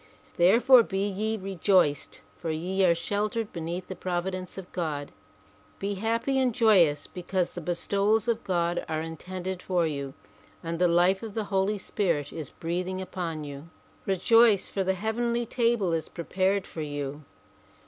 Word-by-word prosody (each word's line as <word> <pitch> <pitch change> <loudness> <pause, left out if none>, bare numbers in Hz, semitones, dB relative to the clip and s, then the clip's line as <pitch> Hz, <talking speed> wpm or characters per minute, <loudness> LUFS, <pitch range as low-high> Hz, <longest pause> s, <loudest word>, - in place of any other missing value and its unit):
Therefore 235 +8 +6
be 195 -2 -1
ye 215 +3 -2
rejoiced 185 -5 +1
for 165 - -5
ye 180 +5 0
are 170 -2 +5
sheltered 210 +4 -2
beneath 170 +2 -4
the 190 - -6
provi 180 +1 -2
dence 185 0 -6
of 190 -2 -8
God. 150 -5 -3 0.7
Be 200 +1 -2
happy 230 +6 0
and 250 -3 +1
joyous 175 -10 +4
because 180 0 -2
the 175 - -7
bestowals 200 +6 +1
of 235 -1 0
God 175 -2 0
are 155 -1 -1
intended 180 +3 -5
for 180 -3 +1
you 140 -3 -4 0.5
and 165 0 -3
the 180 - +4
life 175 +3 +3
of 220 -3 -7
the 220 - -1
Holy 195 +2 +2
Spirit 170 -8 -1
is 155 -5 -5
breathing 180 +3 -3
upon 170 -4 -4
you. 145 +2 -8 0.4
Rejoice, 210 +2 +4
for 195 - -2
the 190 0 +1
heavenly 235 +4 -1
table 230 -7 +1
is 160 -1 -2
prepared 190 +3 0
for 160 - -7
you. 145 -1 -4
185 Hz, 160 wpm, -27 LUFS, 170-205 Hz, 0.7 s, Therefore